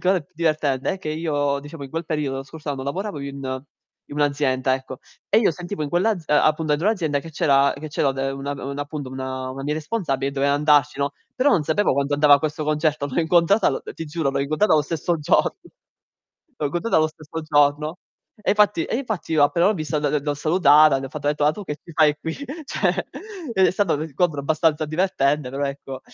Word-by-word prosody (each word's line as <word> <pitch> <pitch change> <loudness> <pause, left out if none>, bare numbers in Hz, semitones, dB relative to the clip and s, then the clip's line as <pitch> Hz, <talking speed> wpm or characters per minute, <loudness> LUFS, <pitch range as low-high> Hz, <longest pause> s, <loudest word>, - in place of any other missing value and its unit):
ancora 185 0 +2
più 180 +4 -22
divertente 155 -5 0
è - - -9
che 185 - -6
io, 145 -3 -1
diciamo, 145 0 -9
in 135 - -10
quel 165 +3 -3
periodo, 150 -4 -2
lo 135 - -4
scorso 150 +3 -11
anno, 135 -2 -3
lavoravo 185 +4 -4
in 135 -2 -5 0.5
in 145 - -8
un'azienda, 140 -3 +1
ecco. 130 -1 -7 0.3
E 215 - +5
io 215 -6 +3
sentivo 175 +2 -6
in - - -4
quell'az 180 +1 0
ehm, 150 - +3
a - - +4
appunto 155 0 +1
dentro 160 +7 +1
l'azienda 160 -10 0
che 165 - -10
c'era 140 -2 +3
che 155 - -7
c'era 145 -1 +1
de 135 0 -2
una 135 +1 -5
un 140 0 -6
appunto, 145 -1 -5
una 130 0 -5
una 135 +1 -6
mia 150 +2 -1
responsabile 150 - -2
e - - -12
doveva 140 0 +1
andarci, 145 -1 +3
no, 140 0 0 0.2
però 265 +3 +2
non 170 - +3
sapevo 160 +6 +1
quando 140 +1 0
andava 145 0 +6
a - - +3
questo 155 0 -2
concerto. 150 -1 0
L'ho 145 +4 -1
incontrata 175 +5 +3
l 135 - -3
ti 165 - -6
giuro, 155 -2 -1
l'ho 140 0 -1
incontrata 155 +7 +2
o 155 - +5
stesso 165 +3 -1
giorno. 150 - +2 1.0
L'ho 150 - 0
incontrata 175 +10 0
lo 155 - +3
stesso 155 +1 -8
giorno. 150 +2 +2 0.4
E - - +1
infatti 205 -5 +3
e - - -2
infatti 220 -10 -4
io 155 -2 +4
appena 170 +4 +2
l'ho 205 - +4
vista, 155 -3 -3
l - - -5
l 145 -1 0
l'ho 145 0 -1
salutata, 155 -2 +5
le 135 - -5
ho - - -9
fatto 145 +2 -6
etto: 150 0 +1
"Ah 150 - +4
tu 205 +6 -8
che 150 - -4
ci - - -13
fai 150 -1 +4
qui? 160 - -4 0.3
Cioè." - - -1 0.5
E 190 -2 +5
è - - +2
stato 190 -2 +1
un 150 - -2
incontro 160 0 -1
abbastanza 155 +1 +1
divertente, 150 -4 0
però 140 +2 -2
ecco, 140 -1 -6
150 Hz, 225 wpm, -22 LUFS, 140-165 Hz, 1.0 s, andava